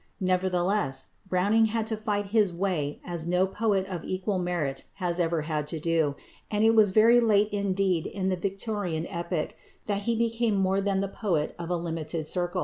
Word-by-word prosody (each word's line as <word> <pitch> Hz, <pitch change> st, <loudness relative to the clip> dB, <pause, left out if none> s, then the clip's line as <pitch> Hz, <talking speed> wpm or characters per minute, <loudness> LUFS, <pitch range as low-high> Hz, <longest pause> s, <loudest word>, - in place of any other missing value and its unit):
Nevertheless, 185 Hz, -5 st, 0 dB, 0.2 s
Browning 205 Hz, +5 st, +3 dB
had 220 Hz, 0 st, -1 dB
to 220 Hz, 0 st, -1 dB
fight 205 Hz, -2 st, -2 dB
his 210 Hz, -5 st, +4 dB
way 170 Hz, -5 st, -2 dB
as 170 Hz, -2 st, -4 dB
no 180 Hz, +2 st, +3 dB
poet 195 Hz, -1 st, 0 dB
of 180 Hz, -4 st, -5 dB
equal 190 Hz, +1 st, -2 dB
merit 170 Hz, -7 st, -2 dB
has 180 Hz, -3 st, -2 dB
ever 165 Hz, -2 st, +1 dB
had 150 Hz, -1 st, -2 dB
to 160 Hz, +1 st, -4 dB
do, 160 Hz, -3 st, +1 dB, 0.3 s
and 210 Hz, 0 st, +1 dB
it 225 Hz, -, +6 dB
was 215 Hz, -2 st, +6 dB
very 225 Hz, +5 st, +6 dB
late 210 Hz, -3 st, +3 dB
indeed 195 Hz, -4 st, 0 dB
in 190 Hz, -2 st, -3 dB
the 185 Hz, -, +1 dB
Victorian 195 Hz, -3 st, -3 dB
epoch 170 Hz, -3 st, -3 dB, 0.3 s
that 200 Hz, -1 st, -2 dB
he 230 Hz, -, +2 dB
became 230 Hz, -1 st, +1 dB
more 195 Hz, 0 st, +2 dB
than 195 Hz, -1 st, 0 dB
the 200 Hz, -, -1 dB
poet 180 Hz, -6 st, -1 dB
of 170 Hz, 0 st, -5 dB
a 175 Hz, -, +1 dB
limited 165 Hz, -1 st, -3 dB
circle. 175 Hz, +2 st, -1 dB
185 Hz, 185 wpm, -27 LUFS, 170-205 Hz, 0.3 s, it